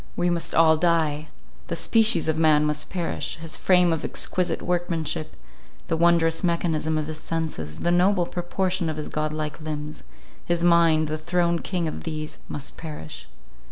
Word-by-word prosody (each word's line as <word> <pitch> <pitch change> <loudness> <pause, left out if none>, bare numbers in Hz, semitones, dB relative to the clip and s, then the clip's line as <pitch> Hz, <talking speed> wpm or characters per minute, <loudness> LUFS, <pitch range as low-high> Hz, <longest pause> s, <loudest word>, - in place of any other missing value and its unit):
We 175 0 +1
must 170 0 -1
all 160 -1 +6
die! 155 -3 +1 0.4
The - - -2
species 225 -6 +3
of 160 0 +1
man 155 -2 +4
must 150 0 -1
perish; 175 -3 -2
his 165 -1 -5
frame 180 -2 +4
of 160 - -3
exquisite 180 -1 -1
workmanship; 170 -3 -2 0.5
the 165 - +2
wondrous 165 0 +3
mechanism 160 -2 0
of 155 - -1
his 155 0 -6
senses; 155 - -4
the 175 - +1
noble 180 +1 +3
proportion 180 0 -2
of 155 - -4
his 150 - -5
godlike 155 0 -3
limbs; 150 -1 -5 0.4
his 175 0 -1
mind, 165 -2 +4
the 155 +1 -3
throned 170 +1 0
king 175 -3 -1
of 155 - -5
these; 155 -2 -5
must 145 -1 -6
perish. 80 - -8
165 Hz, 160 wpm, -24 LUFS, 155-175 Hz, 0.5 s, all